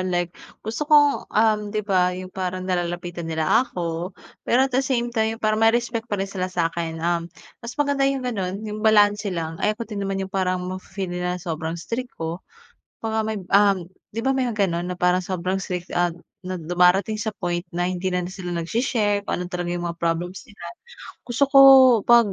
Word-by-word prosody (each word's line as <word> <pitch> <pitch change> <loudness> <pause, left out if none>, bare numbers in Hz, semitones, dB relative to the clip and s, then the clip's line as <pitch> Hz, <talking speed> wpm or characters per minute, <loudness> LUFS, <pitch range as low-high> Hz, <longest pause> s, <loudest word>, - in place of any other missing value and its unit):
like 175 -2 -1 0.3
gusto 225 +8 -3
kong, 290 -2 +4
um 215 -1 +2
'di 215 0 -3
ba, 180 -2 +2
yung 185 0 -8
parang 185 -1 -3
nalalapitan 175 -2 -3
nila 160 +9 +2
ako. 170 -1 -4 0.4
Pero 255 +2 +4
at 270 - -4
the 260 - +3
same 240 -3 -1
time, 220 -1 0
yung 225 - -22
parang 215 0 +2
may 225 0 +5
respect 235 -1 -3
pa 205 - -1
rin 195 - -1
sila 185 -2 -3
sa'kin. 165 -2 -2
Um, 170 -1 0 0.3
mas 235 0 -8
maganda 285 -2 +1
yung 270 -2 -2
ganon, 200 -5 -3
yung 215 0 -5
balanse 210 -1 +4
lang, 165 -1 -4
ayoko 215 +2 0
din 210 -3 -6
naman 195 0 -2
yung 190 - -11
parang 185 -1 0
mafe-feel 185 0 -5
nila 180 0 -2
sobrang 165 -1 -4
strict 235 +9 -5
ko. 165 +2 -4 0.6
Baka 220 -1 -1
may 220 -1 -2
um, 200 -2 +4 0.3
'di 230 - -2
ba 265 - +1
may 265 -1 +1
mga 215 -4 -1
ganon, 170 +1 -2
na - - -2
parang 180 +1 +2
sobrang 185 +1 -1
strict, 180 -2 -5
ah 175 -1 +1 0.3
na 185 -1 -4
dumarating 180 +5 +3
sa 220 0 -3
point 175 -1 -1
na 175 +1 0
hindi 185 0 -2
na 180 - +1
sila 185 -2 -6
nagse-share 205 +3 0
kung - - -2
ano 180 - -4
talaga 175 -1 -3
yung 175 0 -2
mga 170 - -5
problems 170 +4 -2
nila. 210 -6 -19 0.6
Gusto 240 +3 +1
ko 275 - +8 0.4
pag 235 -1 +5
190 Hz, 200 wpm, -23 LUFS, 175-220 Hz, 0.6 s, ko